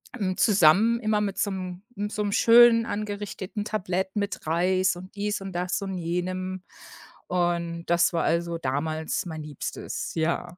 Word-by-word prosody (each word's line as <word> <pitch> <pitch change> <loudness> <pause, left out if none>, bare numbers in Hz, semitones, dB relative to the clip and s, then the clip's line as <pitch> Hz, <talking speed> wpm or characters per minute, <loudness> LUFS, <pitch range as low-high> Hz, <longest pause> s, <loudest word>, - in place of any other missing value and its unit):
hm, 190 -5 -2
zusammen 210 +4 +5
immer 215 -2 +1
mit 200 -2 -2
so 200 - 0
'nem 185 -1 -6
m 205 +1 -3
so 210 -1 -2
'nem 205 - -1
schön 230 +1 +6
angerichteten 205 -1 -4
Tablett, 190 -2 -2
mit 200 -5 -3
Reis 185 +3 +2
und 185 +3 -11
dies 205 0 -2
und 195 -1 -6
das 180 +2 -1
und 190 -1 -4
jenem 185 +2 -3 0.6
und 170 -1 -1
das 170 0 +3
war, 165 - +1
also, 170 0 0
damals 155 +4 -2
mein 160 -2 -6
Liebstes. 150 -2 -5
Ja, 170 +2 -1
185 Hz, 160 wpm, -26 LUFS, 170-205 Hz, 0.6 s, schön